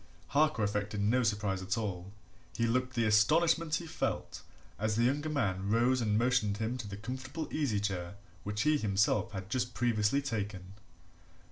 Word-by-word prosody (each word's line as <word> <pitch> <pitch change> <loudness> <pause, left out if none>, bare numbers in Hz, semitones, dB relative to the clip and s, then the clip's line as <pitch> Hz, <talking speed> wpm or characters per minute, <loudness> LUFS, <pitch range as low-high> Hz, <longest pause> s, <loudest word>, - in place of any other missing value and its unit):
Harker 150 -4 +2
affected 105 0 -1
no 110 +5 +2
surprise 105 -4 0
at 95 +4 -2
all 95 -4 -4 0.5
he 115 - +2
looked 125 +2 0
the 115 -1 +2
astonishment 155 +9 +3
he 170 - -3
felt 160 - -3 0.4
as 110 0 0
the 115 - +2
younger 145 +5 +1
man 100 -9 -1
rose 120 +3 +3
and 105 -2 +1
motioned 115 -4 +2
him 110 +3 -2
to 115 - -5
the 100 0 -6
comfortable 130 +8 -5
easy 135 -10 0
chair 95 -3 -3 0.3
which 105 +1 -2
he 150 0 +3
himself 105 +1 +1
had 95 -2 -6
just 120 +2 -2
previously 115 +1 +2
taken. 100 -8 -4
110 Hz, 165 wpm, -32 LUFS, 100-130 Hz, 0.5 s, astonishment